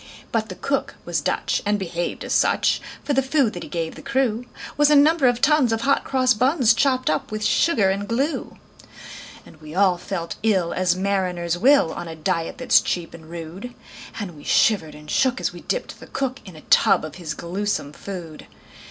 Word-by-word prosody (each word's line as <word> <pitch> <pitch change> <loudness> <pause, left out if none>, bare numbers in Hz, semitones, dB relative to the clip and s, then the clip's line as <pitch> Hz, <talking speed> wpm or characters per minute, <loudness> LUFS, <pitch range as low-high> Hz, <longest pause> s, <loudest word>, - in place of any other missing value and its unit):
But 220 -2 -1
the 185 - -6
cook 275 +7 -2
was - - -1
Dutch, - - -1
and 205 0 +1
behaved 175 -3 -4
as - - -3
such; - - +2 0.2
For 290 - -1
the 270 - +3
food 265 -4 +1
that - - -6
he - - -8
gave 165 -2 -3
the - - -11
crew 260 -4 -1 0.3
Was 295 0 +4
a 300 - +5
number 295 0 +5
of 245 0 +1
tons 290 -5 +4
of 225 0 0
hot 275 +3 +2
cross 255 -1 +2
buns, 250 0 +3
Chopped 255 +1 +1
up 155 0 0
with 215 0 -3
sugar 210 - +3
and 200 +1 -3
glue. 270 +8 -2 0.9
And 155 - -17
we 155 +1 -10
all 185 -2 +3
felt 170 -2 -5
ill 190 -6 +1
as 180 -1 +1
mariners 185 -3 -1
will, 250 - +4
On 175 - -6
a 165 - -7
diet 165 +1 -2
that's 255 0 +4
cheap 175 -2 -3
and 160 -1 -13
rude; 170 +8 -8 0.4
And 190 -6 -6
we 145 - -13
shivered 170 -9 +2
and 150 0 -13
shook 255 - +1
as - - -2
we - - -10
dipped - - -4
the - - -12
cook 270 -1 -3
In 185 -4 -11
a 155 - -12
tub - - +4
of 155 +1 -9
his 160 -4 -5
gluesome 180 -4 -3
food. 170 -5 -8
200 Hz, 205 wpm, -22 LUFS, 170-255 Hz, 0.9 s, a